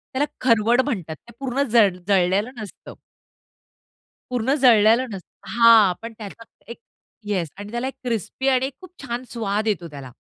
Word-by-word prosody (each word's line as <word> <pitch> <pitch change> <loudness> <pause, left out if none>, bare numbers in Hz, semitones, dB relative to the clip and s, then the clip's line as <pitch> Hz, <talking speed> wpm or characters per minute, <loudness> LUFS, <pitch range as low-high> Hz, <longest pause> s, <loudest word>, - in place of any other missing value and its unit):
त्याला 280 +3 +2 0.2
खरवड 235 0 +3
म्हणतात. 190 - -4
ते 235 - -19
पूर्ण 270 0 -2
जड 205 -6 +4
जळलेलं 195 +4 +2
नसतं. 210 - -10 1.4
पूर्ण 250 +2 0
जळलेलं 230 0 +5
नसतं 190 -3 -12
हां, 230 -5 +6
पण 230 0 -8
त्याचा 215 +1 -10 0.3
एक - - -9 0.5
येस 180 -7 -1
आणि 205 +1 -9
त्याला 240 +2 -3
एक 270 - -5
क्रिस्पी 240 +3 -3
आणि 260 +1 +1
खूप 370 - -12
छान 245 0 -4
स्वाद 215 -1 -2
येतो 180 -5 -1
त्याला. 135 -3 -10
225 Hz, 150 wpm, -22 LUFS, 200-250 Hz, 1.4 s, हां